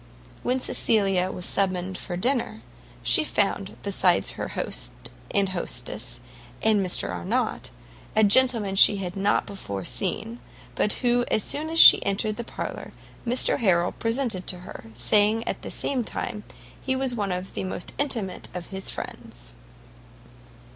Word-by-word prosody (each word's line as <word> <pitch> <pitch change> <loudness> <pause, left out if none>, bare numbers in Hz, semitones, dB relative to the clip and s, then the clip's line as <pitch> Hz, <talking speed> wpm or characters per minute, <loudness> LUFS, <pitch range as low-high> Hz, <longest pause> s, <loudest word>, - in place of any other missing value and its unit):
When 255 +1 0
Cecilia 195 -7 +2
was 180 - -5
summoned 185 -1 0
to 175 -1 -5
dinner, 240 - -1 0.4
she - - +4
found, - - -1
besides - - +2
her - - -5
host - - 0 0.4
and 195 -1 +1
hostess 185 -2 -4 0.4
and 215 -3 +3
Mr 180 - -2
Arnott, 85 -7 -2 0.5
a 220 - +5
gentleman 215 -2 +4
she 200 +1 +6
had 185 -2 -5
not 200 +1 +1
before 100 - -6
seen, 225 +5 -3 0.3
but 210 - +1
who 245 0 +3
as 215 - +1
soon 305 +2 -2
as 330 0 0
she - - +10
entered 210 +2 -1
the 235 - -3
parlour, - - -6 0.3
Mr 245 +2 +2
Harrel 180 -5 +2
presented 225 -5 -1
to 180 -1 -4
her, 180 - -10
saying 210 - +2
at - - -3
the - - -7
same 260 -3 -1
time 210 -1 -5 0.4
he 260 - -1
was 260 -1 -1
one 205 -4 -2
of 180 +1 -4
the - - -3
most 185 -1 -5
intimate 225 -10 -2
of 180 -1 -6
his 190 0 -4
friends. - - -8
200 Hz, 150 wpm, -25 LUFS, 185-235 Hz, 0.5 s, she